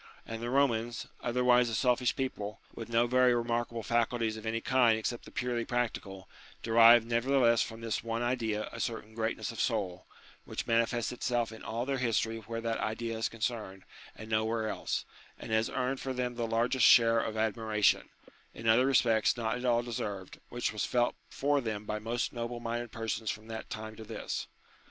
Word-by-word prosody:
And 115 Hz, 0 st, -6 dB
the 120 Hz, -, -3 dB
Eomans, 120 Hz, -3 st, +1 dB, 0.2 s
otherwise 125 Hz, 0 st, +3 dB
a 115 Hz, -, -2 dB
selfish 125 Hz, +1 st, +2 dB
people, 105 Hz, -6 st, -4 dB
with 115 Hz, -, -7 dB
no 115 Hz, +1 st, +3 dB
very 125 Hz, 0 st, +4 dB
remarkable 120 Hz, -1 st, -1 dB
faculties 115 Hz, 0 st, 0 dB
of 110 Hz, 0 st, -7 dB
any 115 Hz, +1 st, 0 dB
kind 120 Hz, -3 st, +3 dB
except 115 Hz, +2 st, -3 dB
the -, -, -12 dB
purely 120 Hz, -1 st, -1 dB
practical, 105 Hz, -6 st, -3 dB, 0.4 s
derived 115 Hz, 0 st, +7 dB
nevertheless 120 Hz, 0 st, +3 dB
from 115 Hz, 0 st, -4 dB
this 115 Hz, -3 st, -2 dB
one 115 Hz, +1 st, -2 dB
idea 115 Hz, -4 st, -1 dB
a -, -, -8 dB
certain 110 Hz, -2 st, -4 dB
greatness 110 Hz, +1 st, -2 dB
of 115 Hz, -, -9 dB
soul, 100 Hz, -7 st, -1 dB, 0.4 s
which -, -, -5 dB
manifests 115 Hz, 0 st, +1 dB
itself 120 Hz, -2 st, -1 dB
in 110 Hz, -, -10 dB
all 115 Hz, +2 st, -3 dB
their 135 Hz, -1 st, -1 dB
history 115 Hz, -2 st, 0 dB
where 115 Hz, +1 st, -5 dB
that 115 Hz, 0 st, -2 dB
idea 115 Hz, +1 st, -2 dB
is 110 Hz, -3 st, -1 dB
concerned 110 Hz, -4 st, -4 dB, 0.3 s
and 110 Hz, -, -9 dB
no 110 Hz, 0 st, +1 dB
where 110 Hz, 0 st, -1 dB
else, -, -, -2 dB, 0.3 s
and -, -, -8 dB
has 110 Hz, +1 st, +2 dB
earned 130 Hz, +1 st, -1 dB
for 130 Hz, -, -3 dB
them 125 Hz, -1 st, -2 dB
the 120 Hz, -1 st, -2 dB
large 120 Hz, +3 st, +1 dB
share 115 Hz, 0 st, +7 dB
of 110 Hz, -1 st, -3 dB
admiration, 110 Hz, -1 st, +1 dB, 0.5 s
in 115 Hz, -, -5 dB
other 120 Hz, +4 st, +5 dB
respects 115 Hz, -4 st, +3 dB
not 115 Hz, 0 st, -1 dB
at 125 Hz, +1 st, -5 dB
all 120 Hz, -1 st, +3 dB
deserved, 105 Hz, -5 st, -5 dB
which 120 Hz, 0 st, -2 dB
has 105 Hz, -2 st, -4 dB
been -, -, -2 dB
felt 120 Hz, -1 st, +2 dB
for 145 Hz, 0 st, +1 dB
them 110 Hz, -3 st, -4 dB
by 105 Hz, 0 st, -3 dB
most 115 Hz, +2 st, -2 dB
noble 120 Hz, 0 st, -4 dB
minded 120 Hz, 0 st, -4 dB
persons 115 Hz, -1 st, -3 dB
from 110 Hz, +1 st, -4 dB
that 110 Hz, 0 st, -7 dB
time 110 Hz, 0 st, -6 dB
to 110 Hz, -, -9 dB
this. 110 Hz, +1 st, -5 dB
115 Hz, 190 wpm, -31 LUFS, 110-120 Hz, 0.5 s, derived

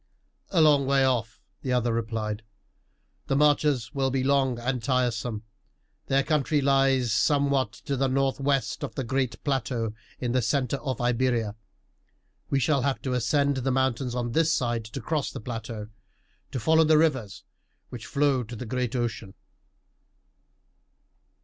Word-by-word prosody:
"A 170 Hz, -, +3 dB
long 145 Hz, -3 st, +5 dB
way 135 Hz, -1 st, +4 dB
off," 115 Hz, -4 st, -1 dB, 0.2 s
the 130 Hz, -, -3 dB
other 120 Hz, -2 st, +1 dB
replied. 110 Hz, -2 st, -2 dB, 0.9 s
"The 135 Hz, -, +1 dB
marches 145 Hz, -4 st, +2 dB
will 135 Hz, -1 st, +1 dB
be 130 Hz, 0 st, 0 dB
long 135 Hz, -2 st, +2 dB
and 125 Hz, +1 st, -2 dB
tiresome. 120 Hz, -3 st, -1 dB, 0.6 s
Their 135 Hz, 0 st, +2 dB
country 150 Hz, 0 st, +1 dB
lies 135 Hz, -4 st, +3 dB
somewhat 140 Hz, -2 st, +2 dB
to 140 Hz, +6 st, -4 dB
the 135 Hz, +1 st, +1 dB
northwest 135 Hz, +1 st, 0 dB
of -, -, -5 dB
the 135 Hz, -, -2 dB
great 130 Hz, +1 st, -2 dB
plateau 125 Hz, -5 st, -1 dB, 0.3 s
in 125 Hz, -1 st, -2 dB
the 130 Hz, +1 st, +2 dB
centre 130 Hz, +2 st, 0 dB
of 130 Hz, -1 st, -4 dB
Iberia. 120 Hz, -3 st, +1 dB, 1.0 s
We 140 Hz, -, +2 dB
shall 140 Hz, 0 st, +2 dB
have 135 Hz, +1 st, 0 dB
to 130 Hz, -, -1 dB
ascend 140 Hz, +3 st, +1 dB
the 130 Hz, +1 st, -1 dB
mountains 130 Hz, -1 st, 0 dB
on 120 Hz, -1 st, -2 dB
this 160 Hz, +5 st, +2 dB
side, 120 Hz, -5 st, 0 dB
to 110 Hz, +5 st, -7 dB
cross 150 Hz, +4 st, -1 dB
the -, -, -7 dB
plateau, 115 Hz, -2 st, -6 dB, 0.6 s
to 130 Hz, -, -3 dB
follow 160 Hz, +7 st, +4 dB
the 155 Hz, 0 st, +5 dB
rivers 130 Hz, -11 st, 0 dB, 0.5 s
which 120 Hz, -3 st, -8 dB
flow 140 Hz, -3 st, +2 dB
to 120 Hz, 0 st, -7 dB
the 125 Hz, -, -6 dB
great 125 Hz, +1 st, -2 dB
ocean." 115 Hz, -5 st, -3 dB
130 Hz, 150 wpm, -26 LUFS, 120-140 Hz, 1.0 s, long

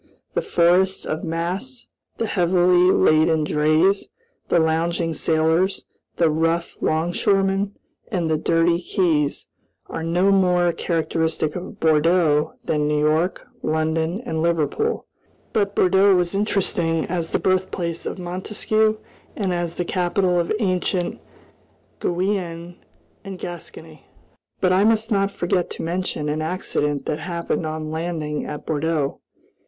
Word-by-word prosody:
The 480 Hz, -, 0 dB
forests 190 Hz, -, +2 dB
of 155 Hz, -, -3 dB
masts, 185 Hz, +10 st, -3 dB, 0.3 s
the 230 Hz, -, -1 dB
heavily 180 Hz, -2 st, +3 dB
laden 155 Hz, -1 st, +3 dB
drays, 155 Hz, +6 st, +2 dB, 0.4 s
the -, -, +3 dB
lounging 165 Hz, +1 st, +1 dB
sailors, 160 Hz, +4 st, +1 dB, 0.3 s
the 170 Hz, -, +3 dB
rough 165 Hz, +2 st, 0 dB
'longshoremen, 195 Hz, +4 st, +1 dB, 0.3 s
and 180 Hz, -6 st, -1 dB
the 160 Hz, -, +1 dB
dirty 170 Hz, +2 st, +2 dB
quays, 160 Hz, -6 st, 0 dB, 0.4 s
are -, -, -6 dB
no 175 Hz, +4 st, +2 dB
more 180 Hz, -3 st, +3 dB
characteristic 160 Hz, -2 st, -1 dB
of 180 Hz, +1 st, -7 dB
Bordeaux 160 Hz, -1 st, +3 dB
than 150 Hz, -1 st, 0 dB
New 150 Hz, 0 st, +1 dB
York, 155 Hz, +5 st, +1 dB, 0.2 s
London, 160 Hz, +4 st, -1 dB
and 160 Hz, -5 st, -2 dB
Liverpool. 170 Hz, -, 0 dB, 0.5 s
But 200 Hz, -2 st, 0 dB
Bordeaux 190 Hz, +1 st, +4 dB
was 175 Hz, 0 st, 0 dB
interesting 180 Hz, -5 st, +1 dB
as 170 Hz, -2 st, -3 dB
the -, -, +1 dB
birthplace 185 Hz, -3 st, -1 dB
of -, -, -4 dB
Montesquieu 215 Hz, +4 st, 0 dB, 0.4 s
and 195 Hz, -4 st, -1 dB
as 175 Hz, -1 st, -2 dB
the 175 Hz, -, -2 dB
capital 180 Hz, 0 st, +1 dB
of 170 Hz, -, -1 dB
ancient 185 Hz, -3 st, -1 dB, 0.8 s
Guienne 175 Hz, -2 st, -2 dB, 0.5 s
and 195 Hz, -2 st, -7 dB
Gascony. 160 Hz, -4 st, -9 dB, 0.5 s
But 185 Hz, -1 st, +3 dB
I 190 Hz, +2 st, +4 dB
must 225 Hz, +1 st, +2 dB
not 195 Hz, -1 st, +2 dB
forget 180 Hz, -2 st, -1 dB
to -, -, -6 dB
mention 170 Hz, -3 st, -2 dB
an 150 Hz, +1 st, -1 dB
accident 150 Hz, -4 st, -2 dB
that 150 Hz, -, -2 dB
happened 170 Hz, -1 st, -3 dB
on 155 Hz, 0 st, -4 dB
landing 160 Hz, -2 st, -3 dB
at 150 Hz, -, -6 dB
Bordeaux. 155 Hz, -2 st, -1 dB
170 Hz, 125 wpm, -22 LUFS, 160-185 Hz, 0.8 s, Bordeaux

